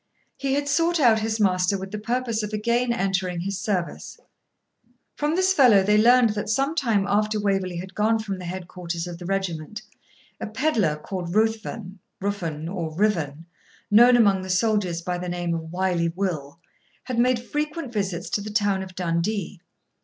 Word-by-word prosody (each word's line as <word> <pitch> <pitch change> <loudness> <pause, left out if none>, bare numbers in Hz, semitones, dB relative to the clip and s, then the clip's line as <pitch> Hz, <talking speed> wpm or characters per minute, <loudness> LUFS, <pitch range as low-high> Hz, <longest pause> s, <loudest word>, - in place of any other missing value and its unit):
He 270 -1 -1
had 285 0 -1
sought 330 +4 +2
out 235 -6 +5
his 220 0 -2
master 185 -1 +2
with 190 0 -7
the 210 - -4
purpose 235 0 -1
of 210 0 -5
again 235 +3 +1
entering 190 -5 -1
his 195 +1 -3
service. 185 -4 -3 1.0
From 300 +2 0
this 375 +1 +3
fellow 245 - +6
they 210 +2 +3
learned 240 0 +5
that 210 0 -4
some 275 +6 +1
time 230 -11 +1
after 210 +1 +1
Waverley 195 -3 0
had 185 +2 -7
gone 220 +2 +2
from 200 -4 -4
the 180 - -7
headquarters 175 -1 -5
of 175 -1 -7
the 175 - -7
regiment, 190 +1 -3 0.6
a - - -4
pedlar, 215 - +1
called 175 +3 -5
Ruthven, 220 -3 -1 0.2
Rufnn, 170 -6 -3
or 170 -3 -4
Rivane, 165 -6 0 0.5
known 240 +4 +7
among 200 -5 +4
the 185 - -7
soldiers 185 -3 +1
by 180 0 -2
the 180 0 -4
name 175 -1 -2
of 160 -1 -5
Wily 180 -2 0
Will, 165 -5 -4 0.4
had 250 -2 -3
made 250 +1 +3
frequent 295 +2 -4
visits 195 -4 -2
to 205 - 0
the 210 - -6
town 205 -3 +1
of 185 -1 -9
Dundee. 180 +2 -2
200 Hz, 175 wpm, -24 LUFS, 180-225 Hz, 1.0 s, known